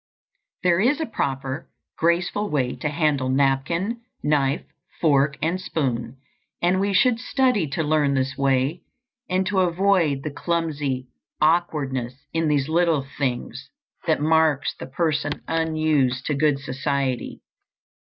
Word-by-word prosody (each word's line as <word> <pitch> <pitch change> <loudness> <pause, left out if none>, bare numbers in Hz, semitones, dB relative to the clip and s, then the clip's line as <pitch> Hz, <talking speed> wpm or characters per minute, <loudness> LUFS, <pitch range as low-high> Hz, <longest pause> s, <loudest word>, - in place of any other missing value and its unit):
There 175 -1 +3
is 255 +9 +3
a 320 - 0
proper, 135 - -3 0.3
graceful 175 +5 +1
way 130 -4 0
to 150 - -2
handle 150 -4 +1
napkin, 140 - +1 0.2
knife, 145 -2 +1 0.4
fork, 145 -2 +3
and 175 +4 0
spoon, 130 -7 -2 0.4
and 180 +2 +2
we 200 +1 +1
should 230 +4 +3
study 250 - +1
to 150 +4 -2
learn 150 -2 +2
this 130 0 0
way 135 +4 +1 0.5
and 185 +1 +1
to 190 0 +1
avoid 175 -5 +2
the 155 - -3
clumsy 145 -6 -2 0.3
awkwardness 145 -7 +1 0.2
in 165 -1 +1
these 145 -2 +1
little 160 -3 +2
things 130 0 -3 0.4
that 160 - +3
marks 155 -2 +2
the - - -9
person 150 0 -1
unused 155 -5 +1
to 150 - 0
good 145 0 +2
society. 135 -1 -2
150 Hz, 130 wpm, -23 LUFS, 135-170 Hz, 0.5 s, There